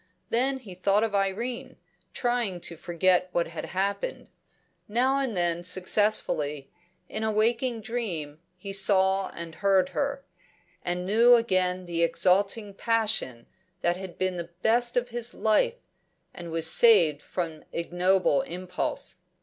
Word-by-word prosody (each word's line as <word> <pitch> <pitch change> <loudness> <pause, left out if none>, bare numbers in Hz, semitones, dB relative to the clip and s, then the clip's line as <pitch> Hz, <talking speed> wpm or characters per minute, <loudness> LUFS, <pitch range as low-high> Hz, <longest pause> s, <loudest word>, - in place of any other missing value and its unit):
Then 265 +4 +2
he 220 -8 -11
thought 195 +4 +1
of 225 -2 -1
Irene, 205 +5 -2 0.4
trying 240 -7 -1
to 170 - -4
forget 180 +2 +1
what 170 - +1
had 165 - -7
happened. 200 - -3 0.6
Now 255 +5 +1
and 255 -8 -2
then 175 0 0
successfully; 180 -6 0 0.4
in 215 - -4
a 220 - +1
waking 230 +2 0
dream 185 -10 -4 0.2
he 195 +2 -7
saw 195 -1 +3
and 170 -1 -8
heard 190 -1 +2
her, 280 -1 -2 0.6
and 180 0 -2
knew 230 +5 +6
again 185 -5 0
the 170 -1 -2
exalting 195 +5 +1
passion 215 - -1 0.4
that 175 0 +1
had 185 -1 -9
been 185 -1 -1
the 170 0 -6
best 240 +2 +2
of 245 0 0
his 240 0 -4
life, 225 - +2 0.6
and 175 -1 -8
was 165 0 -1
saved 160 -6 +6
from 165 -4 -5
ignoble 180 +8 +1
impulse. 180 -9 -4
195 Hz, 135 wpm, -27 LUFS, 175-230 Hz, 0.6 s, knew